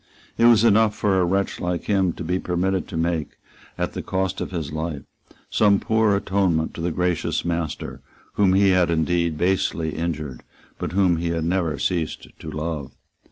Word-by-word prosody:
It 115 - +3
was 115 -2 +6
enough 110 -1 +4
for 100 -3 +1
a 90 - +3
wretch 95 +3 0
like 90 -1 -2
him 95 -3 +2
to - - -7
be 90 +3 -1
permitted 90 +1 -1
to 85 - -5
make, 80 -1 -1 0.4
at - - -2
the - - -4
cost 95 0 -2
of - - -3
his 80 -6 -4
life, 80 -3 -3 0.5
some 100 -2 +4
poor 110 -2 +2
atonement 95 -5 0
to - - -7
the 85 - 0
gracious 90 0 -1
master, 85 -3 -3 0.3
whom 95 -2 +3
he 100 0 +5
had 90 -2 +3
indeed 85 0 +1
basely 85 -2 0
injured, 75 -6 -4 0.4
but - - -4
whom 95 -3 +3
he 85 +1 -2
had 85 -1 -1
never 85 -4 0
ceased 85 -2 -2
to - - -7
love. 75 -3 -4
90 Hz, 180 wpm, -23 LUFS, 80-95 Hz, 0.5 s, was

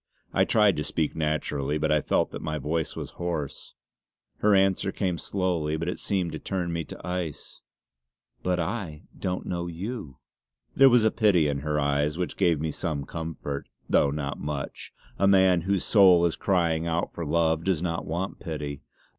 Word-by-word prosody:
I - - +4
tried 105 -5 +4
to 75 - -1
speak 75 +1 -1
naturally 75 -2 -1
but 75 - 0
I 75 -1 +3
felt - - +1
that - - -6
my 75 -1 -2
voice 80 +2 -2
was - - -6
hoarse. 80 -5 -4 0.6
Her 105 -1 +4
answer 95 0 +2
came 90 -5 -1
slowly, 85 -5 -1
but 85 +2 -3
it 90 - -3
seemed 95 -4 -1
to 80 - -5
turn 90 -3 -2
me 85 0 -2
to - - -10
ice: 90 -4 -5 0.8
"But 90 -1 0
I 85 -4 -3
don't 90 0 -3
know 85 -1 -3
you!" 85 - -6 0.6
There 135 0 +8
was 120 -2 +5
a 110 - +4
pity 100 -9 +3
in 70 -1 -1
her 75 +1 -1
eyes 75 +2 +1
which 90 -1 -2
gave 85 -6 +2
me 80 +1 -2
some 75 -4 -3
comfort, 80 -4 -5 0.2
though 70 - +4
not 70 0 -3
much; 75 -2 -5 0.3
a 100 - +4
man 95 -3 +5
whose 95 +1 0
soul 95 -5 +6
is 85 - +1
crying 85 -4 +1
out 85 +1 -1
for 85 - -5
love 80 +1 +1
does 90 -3 0
not 85 -2 -2
want 90 +5 -3
pity. 75 -5 -5
85 Hz, 180 wpm, -27 LUFS, 75-95 Hz, 0.8 s, There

